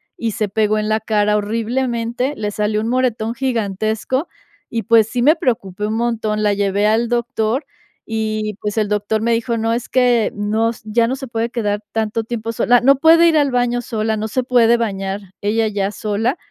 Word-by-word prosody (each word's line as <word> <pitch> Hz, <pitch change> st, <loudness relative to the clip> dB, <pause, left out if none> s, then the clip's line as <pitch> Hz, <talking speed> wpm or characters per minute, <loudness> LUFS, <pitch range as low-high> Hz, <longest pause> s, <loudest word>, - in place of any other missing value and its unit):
y 230 Hz, -1 st, -2 dB
se 215 Hz, +1 st, -1 dB
pegó 215 Hz, +1 st, +1 dB
en 215 Hz, 0 st, -1 dB
la 220 Hz, 0 st, +1 dB
cara 210 Hz, -1 st, +1 dB
horriblemente, 235 Hz, +4 st, -1 dB
le 210 Hz, -1 st, -2 dB
salió 210 Hz, +1 st, -1 dB
un 220 Hz, -, -2 dB
moretón 235 Hz, -3 st, 0 dB
gigantesco 225 Hz, -, -1 dB, 0.4 s
y, 230 Hz, -1 st, -1 dB
pues, 225 Hz, 0 st, +4 dB
sí 245 Hz, 0 st, -2 dB
me 300 Hz, +6 st, +5 dB
preocupé 210 Hz, -, -2 dB
un 220 Hz, -, -2 dB
montón. 220 Hz, -2 st, -1 dB
La 205 Hz, -1 st, +3 dB
llevé 200 Hz, +1 st, +1 dB
al 225 Hz, +2 st, +1 dB
doctor 240 Hz, +2 st, -1 dB, 0.4 s
y, 215 Hz, -1 st, -2 dB
pues, 210 Hz, +1 st, -3 dB
el 210 Hz, -1 st, +2 dB
doctor 210 Hz, +1 st, -1 dB
me 235 Hz, +1 st, +1 dB
dijo: 230 Hz, 0 st, -1 dB
"No 225 Hz, 0 st, 0 dB
es 240 Hz, +1 st, -3 dB
que, 245 Hz, -3 st, +2 dB
no 215 Hz, +2 st, 0 dB
ya 230 Hz, +2 st, +2 dB
no 260 Hz, +3 st, -2 dB
se 270 Hz, -1 st, -7 dB
puede 230 Hz, 0 st, -2 dB
quedar 210 Hz, -3 st, -2 dB
tanto 220 Hz, +1 st, -1 dB
tiempo 230 Hz, 0 st, -4 dB
sola". 245 Hz, +2 st, +4 dB
No 275 Hz, +3 st, +5 dB
puede 325 Hz, +4 st, +6 dB
ir 320 Hz, -2 st, +3 dB
al 285 Hz, -2 st, +2 dB
baño 245 Hz, -1 st, +1 dB
sola, 220 Hz, -2 st, -2 dB
no 215 Hz, +1 st, -3 dB
se 255 Hz, +3 st, -1 dB
puede 235 Hz, -2 st, +4 dB
bañar 195 Hz, -3 st, -3 dB, 0.2 s
ella 220 Hz, +2 st, +1 dB
ya 200 Hz, -1 st, -1 dB
sola. 215 Hz, -, -1 dB
225 Hz, 195 wpm, -18 LUFS, 210-240 Hz, 0.4 s, puede